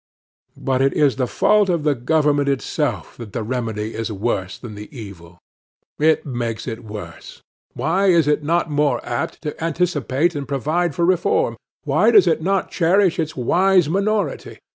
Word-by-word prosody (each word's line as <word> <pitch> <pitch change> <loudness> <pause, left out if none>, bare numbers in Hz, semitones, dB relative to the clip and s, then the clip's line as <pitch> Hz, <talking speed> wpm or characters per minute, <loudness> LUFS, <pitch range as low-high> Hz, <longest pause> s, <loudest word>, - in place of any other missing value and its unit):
But 130 -1 -1
it 135 0 +2
is 145 -4 +2
the 130 -2 0
fault 210 - +3
of 170 -4 0
the 150 -1 +3
government 145 +2 +1
itself 135 -2 -2
that 110 -4 -9
the 115 - -3
remedy 110 -2 -3
is 115 0 -4
worse 95 -3 -2
than 120 -4 -9
the 105 0 -9
evil. 95 - -11 0.6
It 155 +1 +3
makes 120 -4 -4
it 115 -3 -6
worse. 105 -6 -10 0.3
Why 190 +5 +1
is 170 -5 +4
it 150 0 +2
not 165 +4 0
more 145 -4 +1
apt 120 +6 -4
to 150 +1 -5
anticipate 165 -2 0
and 145 -3 -5
provide 150 +4 -1
for 170 - +1
reform? 435 - +1 0.3
Why - - +3
does 410 - +6
it - - +1
not 195 +3 0
cherish 180 +1 +2
its 160 -2 -3
wise 180 +6 +3
minority? 200 +4 -1
145 Hz, 165 wpm, -20 LUFS, 120-175 Hz, 0.6 s, does